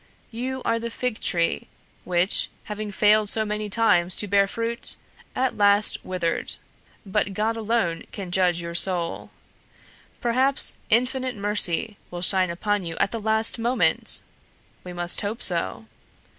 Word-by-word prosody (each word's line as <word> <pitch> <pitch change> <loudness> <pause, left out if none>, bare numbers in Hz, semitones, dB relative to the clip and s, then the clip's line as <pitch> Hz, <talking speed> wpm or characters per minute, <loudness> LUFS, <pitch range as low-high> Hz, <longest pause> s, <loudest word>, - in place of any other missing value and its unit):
You 255 +3 -4
are 230 - +1
the 235 0 -4
fig 245 -1 -3
tree 170 -2 0 0.4
which, 180 +2 +2
having 210 0 -6
failed 210 +1 +3
so 220 0 +1
many 210 0 -3
times 185 -5 +2
to 205 - -1
bear 200 0 +3
fruit, 230 +3 +2 0.4
at 260 0 -1
last 205 +1 +3
withered, 180 -3 -2 0.5
but 200 0 -1
God 220 +3 0
alone 220 -7 -1
can 190 -4 -7
judge 180 -2 +2
your 170 0 -6
soul. 175 -1 0 0.9
Perhaps 260 +3 +1
Infinite 255 +2 0
Mercy 205 0 +1
will 175 0 -6
shine 185 -1 +3
upon 205 +3 -2
you 165 -1 -5
at - - +1
the 230 - -4
last 220 +2 +1
moment! 240 +3 +2 0.6
We 180 - -8
must 175 0 -1
hope 220 +4 -3
so. 170 -10 +3
205 Hz, 145 wpm, -24 LUFS, 180-230 Hz, 0.9 s, failed